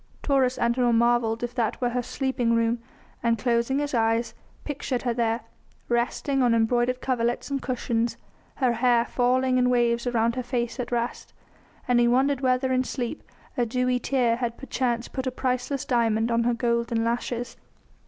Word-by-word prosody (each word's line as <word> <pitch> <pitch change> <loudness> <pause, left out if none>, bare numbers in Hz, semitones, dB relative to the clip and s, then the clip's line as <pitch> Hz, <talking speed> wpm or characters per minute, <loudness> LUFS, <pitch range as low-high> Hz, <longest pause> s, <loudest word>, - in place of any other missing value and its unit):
Taurus 265 -3 +2
Antinor 235 0 +2
marvelled 235 -1 +2
if 240 0 -3
that 235 -4 -1
were 245 - +1
her 250 +1 0
sleeping 245 -2 -1
room 230 +1 +1 0.4
and, 230 -1 +2
closing 235 +3 +1
his 290 0 -2
eyes, 225 0 +1 0.3
pictured 275 -3 -3
her 240 -2 0
there, 230 -1 0 0.5
resting 250 +3 0
on 240 -2 +4
embroidered 240 +2 +1
coverlets 240 +1 -1
and 275 -1 -1
cushions, 235 -2 -1 0.4
her 260 -3 +1
fair - - 0
hair 235 0 +3
falling 255 +1 +2
in 250 0 +3
waves 235 -1 +2
around 235 -1 +1
her 255 - -1
face 240 0 -3
at 250 - -4
rest; 240 0 -3 0.5
and 245 -1 +3
he 240 - +4
wondered 265 +3 +2
whether 260 0 +1
in 255 0 +2
sleep 250 +2 -4 0.3
a 245 - +1
dewy 250 +2 0
tear 245 -3 +1
had 235 -1 -3
perchance 245 -3 -2
put 260 0 -4
a - - 0
priceless 255 +1 -2
diamond 230 -3 +1
on 230 0 +2
her 240 - +2
golden 235 -1 0
lashes. 235 0 -2
240 Hz, 175 wpm, -25 LUFS, 235-255 Hz, 0.5 s, on